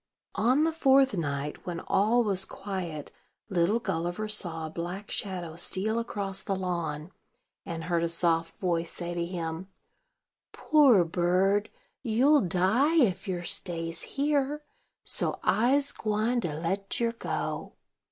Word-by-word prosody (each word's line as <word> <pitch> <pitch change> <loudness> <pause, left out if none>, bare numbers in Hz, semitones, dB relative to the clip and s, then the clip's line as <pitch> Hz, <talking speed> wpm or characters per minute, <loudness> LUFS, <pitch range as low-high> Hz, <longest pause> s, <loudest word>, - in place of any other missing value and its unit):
On 250 +8 +3
the 325 - +2
fourth 270 -5 +4
night, 145 -3 -3
when 170 -1 -3
all 220 +5 +2
was 195 -3 +3
quiet, 185 -7 -5 0.4
little 190 +3 +2
Gulliver 175 0 -2
saw 175 -6 -3
a - - -5
black 175 +5 -6
shadow 180 -5 -3
steal 200 +6 0
across 195 -4 -2
the 195 - -2
lawn, 170 -3 -3 0.6
and 165 -2 -4
heard 170 0 0
a 170 - 0
soft 165 -1 0
voice 170 -3 0
say 175 0 -5
to 170 0 -2
him: 170 0 -4 0.9
"Poor 270 - +5
bird, 185 +4 +1 0.3
you'll 265 +5 +4
die, 195 - +2
if 225 - +2
yer 180 -2 -2
stays 165 -2 -2 0.2
here; 290 +1 0 0.4
so - - -1
I'se 275 +5 +4
gwine 220 +3 0
to 160 -7 -3
let 190 +5 -3
yer 235 -1 +1
go. 230 - -4
190 Hz, 135 wpm, -28 LUFS, 170-230 Hz, 0.9 s, Poor